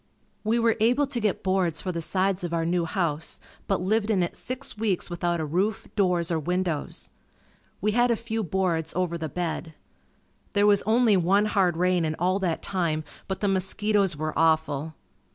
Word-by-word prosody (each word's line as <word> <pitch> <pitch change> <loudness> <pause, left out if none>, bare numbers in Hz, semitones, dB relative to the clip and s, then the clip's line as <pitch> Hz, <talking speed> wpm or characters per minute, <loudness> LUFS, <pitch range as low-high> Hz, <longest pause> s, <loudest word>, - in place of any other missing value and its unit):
We 220 +2 +1
were 230 -1 +2
able 245 +6 +3
to 270 -3 -3
get 210 -4 -1
boards 185 -4 +1
for 185 - -2
the 170 -1 -3
sides 190 +2 0
of 170 -1 -2
our 165 -1 0
new 170 0 +1
house, 160 -3 -1 0.3
but 195 -3 +1
lived 215 +3 +1
in 195 -5 +3
it 170 - -3
six 255 +2 -6
weeks 210 -5 -1
without 175 0 -1
a 160 - -1
roof, 190 +8 -1
doors 180 -4 +1
or 165 - +1
windows. 175 -1 -2 0.7
We 210 +3 +2
had 240 +3 +3
a 235 - +3
few 225 0 -3
boards 170 -3 -1
over 180 -1 0
the 160 -2 -4
bed. 165 -2 -4 0.8
There 205 -1 +4
was 205 -1 +5
only 225 -2 +4
one 195 +4 +3
hard 190 -5 +2
rain 180 0 +2
in 155 -1 -1
all 185 +4 +1
that 175 -4 -1
time 165 -5 -1 0.2
but 190 - -4
the 205 - +1
mosquitoes 195 -1 +1
were 155 +1 -2
awful. 160 -1 +1
185 Hz, 190 wpm, -26 LUFS, 165-205 Hz, 0.8 s, was